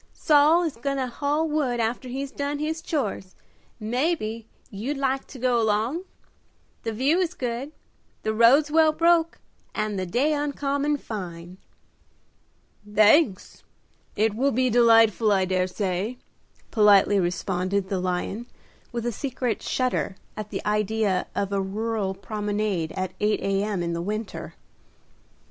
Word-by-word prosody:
"Saul 305 +3 +4
is 315 -8 -3
goin' 275 +3 -2
to 265 - 0
haul 290 +5 -1
wood 285 -6 0
after 235 +3 -2
he's 270 +2 -4
done 285 +1 -3
his 315 +2 -3
chores, 215 - -3 0.4
mebbe 230 -1 -1 0.3
you'd 235 +8 -4
like 270 0 -1
to 275 - -11
go 245 -1 +2
along? 225 - 0 0.8
The 225 - -3
view 270 +10 +2
is 360 -1 -1
good, 250 +3 -4 0.5
the 220 - 0
roads 260 +7 +5
well 315 0 +5
broke, 335 0 +3 0.4
and 215 -2 -1
the 185 - -3
day 265 - +1
uncommon 290 0 -1
fine." 180 -6 -7 1.3
"Thanks; 215 - +3 0.5
it 215 0 +2
will 260 +6 +1
be 255 +1 +1
delightful, 225 -2 +5
I 190 -2 +3
dare 185 0 0
say," 195 +4 -2 0.5
politely 205 -2 +5
responded 185 +2 -1
the 195 - -1
lion, 185 +6 -3 0.4
with 235 -1 -4
a 240 - 0
secret 250 -1 -3
shudder 255 -6 -1 0.2
at 215 -1 -6
the - - -5
idea 210 -2 0
of 200 0 -1
a 195 - +1
rural 205 0 -2
promenade 205 -4 -2
at 185 0 -3
8 210 0 +1
A.M. 195 -1 -1
in 170 0 -2
the 170 - -2
winter. 210 +3 -5
225 Hz, 140 wpm, -25 LUFS, 200-275 Hz, 1.3 s, roads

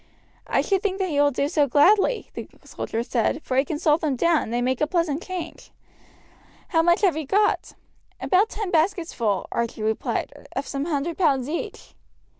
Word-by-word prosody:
"I - - +2
should 390 -2 0
think 390 -2 -1
that 380 -2 -1
he 290 -3 0
will 290 - +5
do 280 +1 -1
so 295 -2 +2
gladly," 390 - +3
the - - -7 0.2
soldier 225 +1 -4
said, 240 +3 0
"for 255 - -3
he 265 - +4
can 295 +1 -4
salt 305 +1 +2
them 295 -4 0
down, 335 +4 +2
and - - -6
they 240 - 0
make 255 +2 -1
a 300 - +2
pleasant 335 -3 0
change. 365 -2 -7 1.0
How 325 -3 +3
much 345 +1 +3
have 380 -6 +3
you 310 -3 -4
got?" 415 +6 +1 0.4
"About 390 +4 +2
ten 415 -3 -4
baskets 345 +1 +1
full," 205 -5 -1
Archie 230 -2 -2
replied, 220 0 -3
"of 275 - -2
some 275 0 -3
hundred 320 +1 -2
pounds 275 -7 +2
each." 320 +3 -6
310 Hz, 195 wpm, -24 LUFS, 270-360 Hz, 1.0 s, will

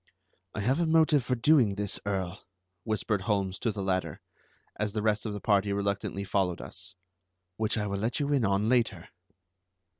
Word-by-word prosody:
"I 110 - -2
have 130 +9 +1
a 170 - +2
motive 160 -3 +4
for 125 +1 0
doing 120 -5 +4
this, 100 -1 -2
Earl," 95 -2 -3 0.4
whispered 110 -2 0
Holmes 100 -1 -1
to 115 - 0
the 100 -2 -4
latter, 95 -1 -1 0.6
as 105 -1 -2
the 105 -1 -2
rest 110 0 +1
of 105 - -3
the 105 - -4
party 100 -1 +2
reluctantly 100 0 -2
followed 95 -3 0
us, 95 +1 -8 0.6
"which 110 +1 0
I 105 - 0
will 100 -1 -2
let 115 +7 -1
you 145 0 0
in 135 -4 +2
on 100 +1 +2
later." 115 -8 +1
105 Hz, 180 wpm, -29 LUFS, 100-115 Hz, 0.6 s, motive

